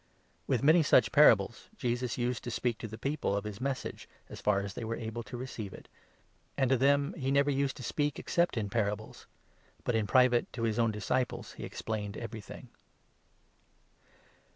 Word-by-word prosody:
'" - - -39
With 130 -2 +1
many 160 +4 +6
such 150 - +4
parables - - +5
Jesus 120 0 -1
used 120 -1 -1
to - - -3
speak 120 -1 -1
to 115 - -5
the 110 +1 -8
people 140 -2 -1
33 - - +1
of 100 - -2
his 105 +1 -7
Message, 135 -1 -4 0.2
as - - -9
far 100 -1 +2
as 100 0 -5
they 115 - -6
were 115 +1 -2
able 115 0 -5
to 115 +2 -8
receive 115 -6 -6
it; - - -14 0.7
and 135 -2 +2
to - - +6
34 135 - +4
them 140 0 +2
he 130 - 0
never 140 +1 +3
used 140 0 0
to 130 - -8
speak 145 +3 -1
except 170 -7 0
in 105 -2 -1
parables; 105 -1 -2 0.6
but 125 - 0
in 110 -2 +1
private 125 -1 +4
to 115 - -4
his 115 0 0
own 115 -1 +3
disciples 110 +4 -2
he - - -9
explained 105 -2 -4
everything. 110 -3 -8
120 Hz, 195 wpm, -31 LUFS, 110-135 Hz, 0.7 s, many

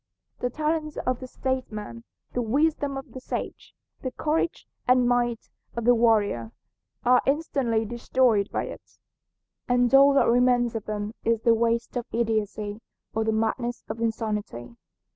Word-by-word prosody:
The 245 - -1
talents 305 +2 -2
of 255 -1 0
the 255 - -7
statesman, 215 - -4 0.3
the 245 - 0
wisdom 280 +3 +1
of 270 -1 -8
the 260 - -7
sage, - - -6 0.3
the 260 - -2
courage 310 +5 -1 0.2
and 250 -1 +5
might 240 -1 0 0.3
of 235 -1 -3
the 245 - +7
warrior, 210 - +2 0.5
are 250 0 +6
instantly 270 -6 +1
destroyed 235 -2 +1
by - - -1
it, - - -10 0.7
and 245 0 +3
all 275 +1 +7
that - - +5
remains 245 0 +3
of 225 -2 -4
them 210 0 -3
is 230 -1 +1
the 230 - +5
waste 230 +1 0
of 240 - -3
idiocy 215 -2 -1 0.3
or 220 - 0
the 220 - +1
madness 225 +2 -1
of 225 +1 -5
insanity. 210 - -3
235 Hz, 150 wpm, -26 LUFS, 220-255 Hz, 0.7 s, the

